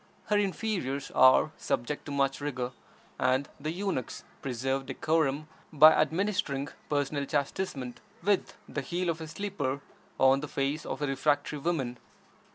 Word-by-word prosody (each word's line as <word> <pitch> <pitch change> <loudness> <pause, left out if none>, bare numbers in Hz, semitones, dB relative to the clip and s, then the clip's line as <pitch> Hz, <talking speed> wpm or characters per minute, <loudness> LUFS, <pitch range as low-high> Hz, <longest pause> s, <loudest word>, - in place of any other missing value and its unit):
Her 210 - +4
inferiors 190 - -1
are 130 +4 +6
subject 145 +5 -2
to - - -5
much 140 0 +1
rigor, 130 -4 -2 0.5
and 130 +2 +2
the 150 +2 -3
eunuchs 180 - -3 0.2
preserve 135 +1 -2
decorum 155 -2 +1 0.2
by 155 0 +9
administering 155 -4 +1 0.2
personal 145 -1 0
chastisement 140 -3 -2 0.2
with 200 0 +1
the 140 - -3
heel 175 +6 -2
of 165 0 -6
a 160 - -5
slipper 160 -6 -2 0.4
on 135 +1 +6
the 150 - -5
face 140 +3 -2
of - - -3
a - - +1
refractory 145 +2 +1
woman. 135 -6 -1
145 Hz, 140 wpm, -30 LUFS, 135-165 Hz, 0.5 s, by